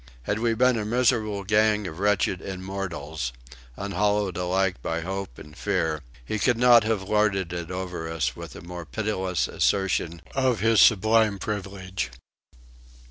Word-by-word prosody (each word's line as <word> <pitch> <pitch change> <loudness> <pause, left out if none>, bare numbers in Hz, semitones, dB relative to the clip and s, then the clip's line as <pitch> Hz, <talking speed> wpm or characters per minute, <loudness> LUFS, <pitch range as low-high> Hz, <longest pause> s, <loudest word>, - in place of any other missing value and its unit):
Had 100 - -1
we 115 0 +1
been 125 0 +3
a - - -2
miserable 110 -3 +1
gang 105 +1 +2
of 85 -1 -6
wretched 100 -2 +1
immortals, 90 -8 -5 0.4
unhallowed 100 0 0
alike 90 -4 0
by 85 +5 -2
hope 95 -6 -5
and 75 0 -12
fear, 80 -6 -1 0.2
he 110 - -2
could 120 +2 +2
not 120 -1 +7
have 110 -3 0
lorded 95 -3 +1
it 85 -1 -5
over 90 -3 -4
us 80 -2 -1
with - - -9
a - - -9
more 85 +1 -7
pitiless 95 -2 -1
assertion 85 -4 0
of 130 -5 +1
his 115 +1 +4
sublime 110 -1 +4
privilege. 95 - -4
95 Hz, 145 wpm, -25 LUFS, 90-110 Hz, 0.4 s, not